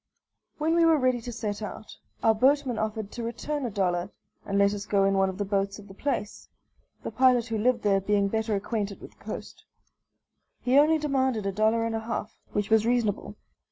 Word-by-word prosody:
When 315 +1 +1
we 340 0 +4
were 325 -1 +5
ready 255 -3 +1
to 240 - -6
set 215 -2 -4
out, 210 +1 -7 0.3
our 225 - +5
boatman 265 +1 +2
offered 215 -1 -3
to 240 - -6
return 255 +4 -3
a - - -3
dollar 185 -3 -1 0.4
and 200 - 0
let 200 0 +4
us 205 0 -6
go 200 -1 +2
in 195 0 +3
one 195 0 +2
of 185 - -6
the 205 - -2
boats 195 0 -1
of 205 -1 -13
the 195 - -12
place, 210 -2 -4 0.5
the - - -4
pilot 255 -3 +4
who 225 - -1
lived 240 +1 +1
there 195 -2 +3
being 200 0 +2
better 220 +1 -1
acquainted 205 0 -3
with - - -11
the - - -24
coast. - - -7 1.0
He 255 +3 +5
only 310 +2 +5
demanded 265 -7 0
a 195 - 0
dollar 220 +3 +2
and 230 - -2
a 225 - -1
half, 225 -1 -4 0.2
which 205 +1 -2
was 220 -1 +5
reasonable. 230 -3 0
220 Hz, 210 wpm, -27 LUFS, 200-250 Hz, 1.0 s, were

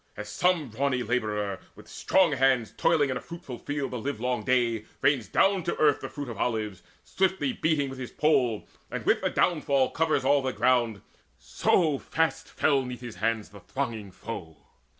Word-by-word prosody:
As 105 0 -6
some 170 +3 +1
brawny 130 +2 0
labourer, 105 -5 -1 0.2
With - - -15
strong 185 -4 +2
hands 130 -4 +2
toiling 145 -5 +2
in 130 - -1
a - - -7
fruitful 155 -8 -9
field 145 -1 -3
The 125 - -3
livelong 125 -1 -2
day, 120 -4 +1 0.2
rains 135 -6 +3
down 195 - +3
to 175 - -1
earth 150 -2 +4
the - - -5
fruit 145 -2 -6
Of 115 -4 -7
olives, 110 -5 -2 0.2
swiftly 190 +7 0
beating 155 -8 +1
with 135 0 -8
his 125 - -5
pole, 125 -8 +1 0.2
And - - -5
with - - +3
the - - +1
downfall 140 -6 +2
covers 155 -4 +1
all 140 +1 +4
the 130 -1 -2
ground, 120 -6 +1 0.3
So 155 -6 +1
fast 160 -3 -1
fell 140 -3 +2
'neath 125 -1 -7
his 120 -6 -8
hands 110 +1 -1
the 100 - -13
thronging 115 -2 -4
foe. 90 -5 -8
130 Hz, 180 wpm, -27 LUFS, 115-145 Hz, 0.3 s, earth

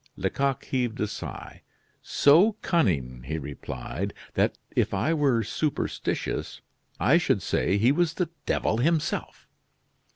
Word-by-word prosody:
Lecoq 135 -2 -1
heaved 125 -2 -1
a - - +1
sigh. 105 - -7 0.4
"So 170 +10 +5
cunning," 70 - +1
he 80 +2 -2
replied, 70 -3 -5 0.2
"that, - - +1 0.2
if - - +1
I 125 +12 +1
were 135 -7 +2
superstitious, 145 +8 -2 0.4
I - - +5
should - - +1
say 100 - +1
he 115 +6 +4
was 170 +2 +1
the 180 -3 -1 0.2
devil 110 - +1
himself." 155 +5 -1
125 Hz, 125 wpm, -26 LUFS, 95-155 Hz, 0.4 s, So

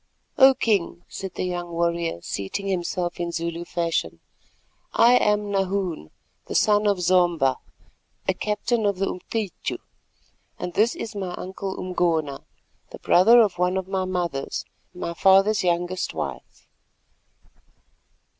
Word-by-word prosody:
"O 265 0 +8
King," 195 -7 0
said 190 -2 -7
the - - -2
young 175 -1 -3
warrior, 170 - -1
seating 100 - -4
himself 180 -2 -2
Zulu 170 0 -3
fashion, 170 -1 -2 0.7
"I 235 +1 +6
am 210 -3 +2
Nahoon, 190 - -1 0.4
the - - -5
son 210 0 +3
of 200 -2 +2
Zomba, 175 -6 +3 0.7
a - - +3
captain 210 +1 -1
of 200 -2 0
the 195 - 0
Umcityu, 200 +2 -4 0.8
and 175 - -5
this 220 +6 +2
is 225 - -6
my 185 -3 -4
uncle 190 +1 -6
Umgona, 165 -6 0 0.5
the - - -9
brother 225 +7 +6
of 190 -5 +1
one 180 +1 +1
of 190 -1 -3
my 190 -1 -1
mothers, 175 -7 -3 0.3
my 180 -1 -5
father's 195 +4 +4
youngest 175 +1 -1
wife." - - -6
185 Hz, 125 wpm, -24 LUFS, 170-200 Hz, 0.8 s, O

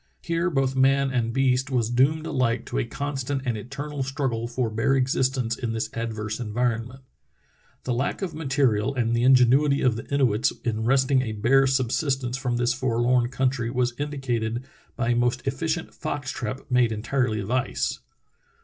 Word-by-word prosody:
Here 170 +1 0
both 135 -4 0
man 135 +1 +3
and 120 -3 0
beast 130 +1 +1
was 120 -3 0
doomed 145 +6 +2
alike 130 -6 0
to - - -2
a - - 0
constant 140 -1 -3
and 120 -3 0
eternal 140 +6 -5
struggle 130 -4 -2
for 120 -1 -2
bare 115 +5 +1
existence 130 -2 +1
in 115 -2 -3
this 110 - -3
adverse 110 -1 -4
environment. 120 +2 -2 0.8
The 125 - -1
lack 130 +10 -2
of 175 -4 -3
material 135 -6 +1
and 120 -2 +1
the 115 - +1
ingenuity 135 +3 +5
of 125 -4 +2
the 115 - -9
Inuits 125 -6 +2
in 110 -2 -1
wresting 130 +1 +3
a 110 -4 -3
bare 130 +6 +3
subsistence 130 0 0
from 125 -3 -1
this 120 0 +1
forlorn 120 -1 +1
coun 130 0 +1
try 120 -3 -3
was 125 0 0
indicated 125 -5 -2 0.3
by 115 - -1
a 120 - +3
most 120 +2 0
efficient 160 +5 -2
fox 140 -2 -4
trap 130 +1 -4
made 125 -2 +3
entirely 110 +1 -1
of 100 +3 -5
ice. 130 0 -1
125 Hz, 170 wpm, -25 LUFS, 115-135 Hz, 0.8 s, ingenuity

